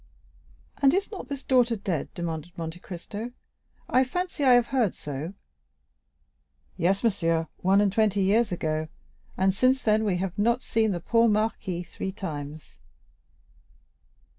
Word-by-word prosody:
"And 275 +3 +5
is 395 +3 -1
not 390 - -7
this 280 0 -5
daughter 245 -3 +3
dead?" 190 -7 -3
demanded 170 0 -5
Monte 165 +1 -5
Cristo; 205 +7 -7 0.5
"I 255 - +4
fancy 355 +3 -3
I 260 -2 +7
have 245 -1 +5
heard 235 -8 +2
so." 150 +6 -6 1.4
"Yes, 190 +5 +1
monsieur, 165 -7 +1
one 190 +2 +3
and 200 -2 +2
twenty 205 -3 +2
years 210 +3 +3
ago; 155 -2 -1 0.5
and 190 0 +3
since 255 +5 +2
then 215 0 +3
we 195 -4 +1
have 185 +1 -3
not 235 +4 +2
seen 220 -1 +1
the 175 -4 -2
poor 230 +5 +3
marquis 210 -4 -1
three 190 - -5
times." 155 -6 -7
200 Hz, 140 wpm, -27 LUFS, 175-235 Hz, 1.4 s, I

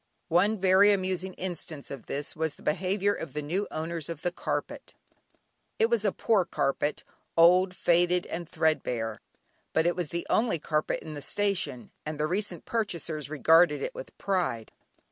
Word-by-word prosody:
One 195 +6 +3
very 190 +2 +6
amusing 185 -1 -1
instance 165 -5 -6
of 135 -4 -8
this 145 +1 -4
was 160 -1 -2
the - - -18
behaviour 190 +5 +1
of 165 - -6
the 150 - -2
new 185 +8 -1
owners 160 0 -3
of 165 -2 -6
the 175 - +1
carpet. - - -4 0.8
It 225 +1 +3
was 230 -3 +2
a 205 - +2
poor 210 -2 +2
carpet, 145 -3 -1 0.3
old, 180 +2 +6
faded, 175 +1 +3
and 170 -1 -5
thread 160 -1 +2
bare, 115 -3 -3 0.5
but 160 - +3
it 175 - +2
was 180 -3 -2
the 170 +2 -4
only 220 -6 +2
carpet 155 0 -1
in 155 - -7
the 145 - -6
station 195 -10 -2
and 155 -1 -5
the 150 - +2
recent 180 0 -2
purchasers 170 -9 -2
regarded 160 +1 +4
it - - -3
with - - -9
pride. 175 - -1
175 Hz, 170 wpm, -28 LUFS, 155-190 Hz, 0.8 s, very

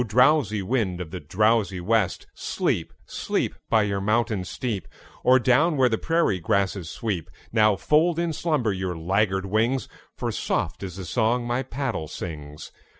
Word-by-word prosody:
drowsy 120 -2 +3
wind 100 -5 0
of 90 -3 -6
the 90 - -5
drowsy 100 +4 +1
west, 100 0 +1
Sleep, - - -1
sleep, - - -2 0.2
By 110 -2 +4
your 100 -1 -1
mountain 110 -1 +1
steep, 110 -1 -4 0.4
Or 130 +1 +6
down 140 +6 +3
where 130 -2 +4
the 110 - 0
prairie 165 - +1
grasses 95 -1 0
sweep! 95 -6 -3 0.2
Now 110 -2 +4
fold 155 - +2
in 170 -1 0
slumber 145 - 0
your 95 -2 -3
laggard 95 +3 +1
wings, 115 +6 +1 0.3
For - - -2
soft - - -2
is 95 -3 -6
the 95 -1 -6
song 120 +6 +1
my 120 +2 0
paddle 130 - -3
sings. 75 -2 -7
110 Hz, 155 wpm, -25 LUFS, 95-125 Hz, 0.4 s, Or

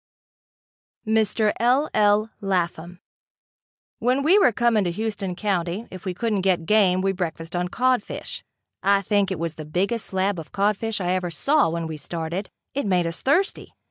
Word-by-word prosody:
Mr. 220 -1 +2
L. 255 +6 +3
L. 210 +1 +3
Lapham. 175 -2 -2 1.0
When 255 +3 +1
we 360 +8 +5
were 320 - +5
coming 230 -2 +2
to - - +1
Houston 200 -1 -3
County, 190 +1 -2
if 185 -2 -10
we 185 -2 -3
couldn't 215 -1 0
get 180 -3 +1
game 185 -2 +3
we 195 0 +1
breakfasted 170 -2 -4
on 175 0 0
codfish. 250 +3 -1 0.4
I 200 0 +3
think 200 -1 +1
it 190 - -2
was 165 0 -3
the 155 - -8
biggest 195 +9 0
slab 190 -1 0
of 160 - -10
codfish 210 +2 0
I 180 -1 -1
ever 180 -1 -1
saw 275 - +2
when 165 0 -3
we 160 -1 -5
started. 170 +5 -4 0.2
It 280 -5 -2
made 180 -3 +2
us 165 0 -4
thirsty. 345 +9 0
195 Hz, 170 wpm, -24 LUFS, 175-220 Hz, 1.0 s, we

